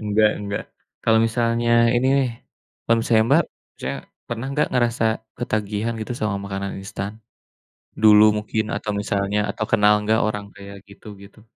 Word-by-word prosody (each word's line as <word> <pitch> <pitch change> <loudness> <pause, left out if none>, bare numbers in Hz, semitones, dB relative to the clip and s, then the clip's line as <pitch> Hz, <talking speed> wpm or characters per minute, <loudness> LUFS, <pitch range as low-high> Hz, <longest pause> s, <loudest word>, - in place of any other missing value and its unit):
Enggak 105 0 +3
enggak. 100 0 -4 0.4
Kalau 110 0 +4
misalnya 115 0 +2
ini 120 +2 +2
nih, 130 -3 +1 0.5
kalau 115 - +3
misalnya 110 -1 +3
Mbak, 160 +5 +5 0.3
misalnya - - -4 0.3
pernah 120 +2 -4
enggak 150 +2 0
ngerasa 120 -2 +1 0.3
ketagihan 110 -1 -2
gitu 110 +3 -4
sama 105 -4 -1
makanan 100 0 -4
instan, 100 +2 -6 0.8
dulu 105 -1 +8 0.2
mungkin 110 +1 -2
atau 105 - -4
misalnya 100 -1 -1
atau 110 +2 -3
kenal 105 0 +5
enggak 110 +2 +2
orang 105 -1 -3
kayak 100 0 -11
gitu, 100 - -16 0.2
gitu? 100 +2 -16
110 Hz, 150 wpm, -22 LUFS, 105-115 Hz, 0.8 s, dulu